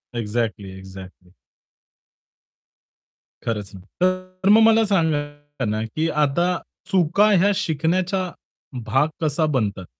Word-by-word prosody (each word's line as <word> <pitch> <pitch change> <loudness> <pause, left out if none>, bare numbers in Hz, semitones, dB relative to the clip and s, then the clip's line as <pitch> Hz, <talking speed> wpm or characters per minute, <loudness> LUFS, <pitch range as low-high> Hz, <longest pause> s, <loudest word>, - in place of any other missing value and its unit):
Exactly, 110 -4 -3
exactly. 95 -1 -12 2.1
खरंच 105 -4 -3
नाही. 95 0 -12 0.2
तर 185 +1 0
मग 220 +2 +7
मला 225 0 +5
सांगा 145 - -1
ना 110 0 -1
की 155 +8 -2 0.2
आता 150 +5 +1 0.4
चुका 195 +3 +3
या 195 +2 +4
शिकण्याचा 185 +2 -1 0.5
भाग 135 +7 +2
कसा 155 0 +1
बनतात. 100 -6 -1
150 Hz, 100 wpm, -22 LUFS, -, 2.1 s, मग